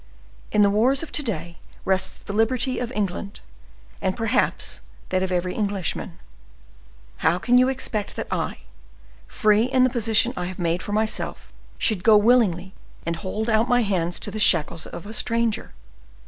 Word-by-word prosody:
In 210 - +4
the 200 - +4
war 220 +6 +3
of 295 +4 -3
to - - +4
day 175 - -4 0.3
rests 190 0 0
the 200 - -6
liberty 245 +4 +1
of 245 -1 -4
England, 200 -1 -3 0.6
and, 190 +2 -1
perhaps, 225 +2 0 0.3
that 185 - 0
of 190 0 -2
every 180 0 -1
Englishman. 200 -5 -3 1.0
How 160 +2 +2
can 245 +6 +3
you 255 +1 +4
expect 240 -6 -3
that - - -4
I, - - -3 0.7
free 215 +1 +2
in 255 0 +2
the 255 - +3
position 235 0 +2
I 180 - -3
have 185 0 -6
made 170 0 -1
for - - -6
myself, 215 +1 -2 0.2
should 210 -5 +1
go 215 0 +7
willingly 205 -5 +2 0.3
and 170 0 -2
hold 210 +6 -4
out 225 +2 +2
my 245 -1 +3
hands 175 -4 -1
to 205 - -2
the 215 - -5
shackles 165 -4 +4
of 175 - -9
a 215 - -8
stranger? 230 -2 0
210 Hz, 170 wpm, -23 LUFS, 185-235 Hz, 1.0 s, go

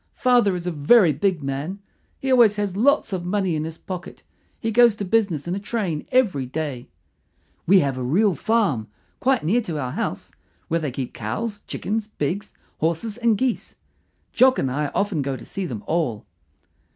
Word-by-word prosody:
Father 245 -7 +3
is 175 -1 -5
a 180 - -1
very 165 +3 +5
big 170 +1 0
man. 140 +8 -3 0.4
He 270 - -2
always 235 -5 +6
has 205 -3 -2
lots 275 +1 +2
of 180 -2 -2
money 185 -1 0
in 155 0 -2
his 160 0 -6
pocket. 180 -2 -8 0.4
He 225 - -2
goes 235 -1 +5
to 205 - -4
business 185 -7 +1
in 175 - -1
a 195 - -2
train 200 -7 -3
every 195 - +2
day. 140 -3 -4 0.8
We 190 +2 +6
have 135 -3 -1
a - - -3
real 190 - +3
farm, 190 - 0 0.3
quite 265 -1 +2
near 225 +9 +3
to 170 -8 -4
our 130 -3 -3
house, - - -4 0.4
where 165 - +1
they 155 -3 -2
keep 130 0 -5
cows, 215 -2 -4
chickens, 215 +1 -3
pigs, 195 0 -3 0.3
horses, 170 +7 -1
and 230 -3 +2
geese. 255 0 -2 0.6
Jock 260 0 +5
and 130 - 0
I 145 +3 -1
often 200 -7 0
go 135 -1 -2
to - - -12
see 195 -2 -4
them 110 -8 -6
all. 145 -11 -1
185 Hz, 185 wpm, -23 LUFS, 150-220 Hz, 0.8 s, always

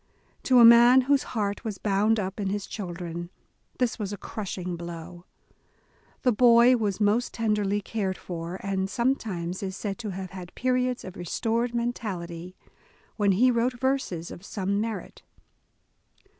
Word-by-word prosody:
To 255 - +5
a 235 - +9
man 240 +2 +8
whose 280 +2 +2 0.2
heart 205 0 -1
was 215 -4 -4
bound 210 +3 +2
up 195 +1 -4
in 195 -2 -1
his 205 0 -2
children, 175 -3 -6 0.5
this 250 -3 0
was 205 -2 -3
a 205 - -5
crushing 185 -4 -5
blow. 170 +1 -8 1.0
The 250 - +4
boy 240 +2 +6
was 210 -4 -1
most 215 +3 +1
tenderly 210 -2 0
cared 195 -3 -3
for, 170 0 -6
and 195 -1 -1
sometimes 200 -8 -1
is 190 -1 -4
said 205 0 -4
to 220 -3 -4
have 190 -1 -6
had 180 -2 -9
periods 250 0 0
of 185 0 -9
restored 230 +7 -1
mentality, 185 -7 -4 0.6
when 205 -3 +3
he 250 +7 +4
wrote 245 +1 0
verses 260 -11 -1
of 175 - -10
some 200 0 -2
merit. 225 0 -5
205 Hz, 150 wpm, -26 LUFS, 185-235 Hz, 1.0 s, a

